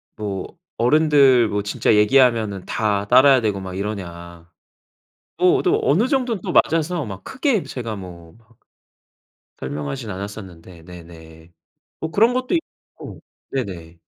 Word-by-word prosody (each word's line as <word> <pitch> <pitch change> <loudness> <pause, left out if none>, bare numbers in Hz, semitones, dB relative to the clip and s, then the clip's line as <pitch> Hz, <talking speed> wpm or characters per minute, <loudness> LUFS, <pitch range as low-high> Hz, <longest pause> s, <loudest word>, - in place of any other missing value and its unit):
뭐 100 - -6 0.2
"어른들 135 -2 +4
뭐 100 0 -2
진짜 105 +1 +1
얘기하면은 110 -3 +3
다 105 -2 -1
따라야 130 +2 +6
되고 105 -3 -1
막 95 -1 -7
이러냐?" 85 -4 -7 0.9
또 180 0 +4
어도 - - +1
어느 190 - +2
정도는 250 - -1
또 185 - -4
맞아서 165 0 +1
막 95 -2 -9
크게 260 - 0
제가 115 -4 -6
뭐 85 -4 -11
막 115 0 -27 1.0
설명하진 75 - -5
않았었는데 95 -3 -9
네네. 80 -2 -14 0.5
뭐 160 - -4
그런 225 +7 +3
것도 255 +5 -1
있고 330 - -7 0.3
네네. 85 -10 -6
105 Hz, 260 characters per minute, -21 LUFS, 90-145 Hz, 1.0 s, 따라야